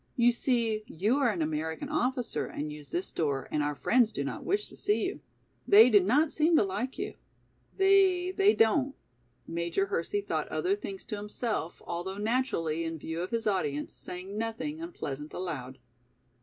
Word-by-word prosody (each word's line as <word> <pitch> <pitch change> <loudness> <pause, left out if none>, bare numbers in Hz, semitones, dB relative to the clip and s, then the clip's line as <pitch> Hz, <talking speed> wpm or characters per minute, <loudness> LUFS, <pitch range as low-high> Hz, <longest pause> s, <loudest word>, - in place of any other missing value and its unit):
"You 240 0 +5
see 235 -3 0
you 210 - +1
are 270 -4 +3
an 180 -7 0
American 160 - -3
officer 255 -5 -1
and 150 +1 -5
use 150 -2 -9
this 180 +2 -3
door 140 -5 -1
and 150 - +1
our 145 0 -1
friends 235 - +3
do 140 - -3
not 135 -2 -5
wish 410 +2 0
to - - -10
see 215 +1 +1
you. - - -3 0.5
They 220 +5 +8
do 205 - +8
not 270 - +3
seem 320 +1 +4
to - - +5
like 220 +7 -3
you." 400 +3 -3 0.6
"They—they 385 0 +4
don't," 260 +5 +3 0.5
Major 170 - -1
Hersey 410 +1 -1
thought - - -2
other 380 +2 0
things 395 -2 -7
to 210 - -4
himself, 210 -3 -3
although 180 +3 -4
naturally, 205 -8 0
in 165 0 -3
view 160 +2 -4
of 180 - -3
his 230 0 -2
audience, 150 -8 -1
saying 185 +3 -7
nothing 225 +8 -3
unpleasant 150 - -6
aloud. 135 -8 -5
215 Hz, 170 wpm, -29 LUFS, -, 0.6 s, They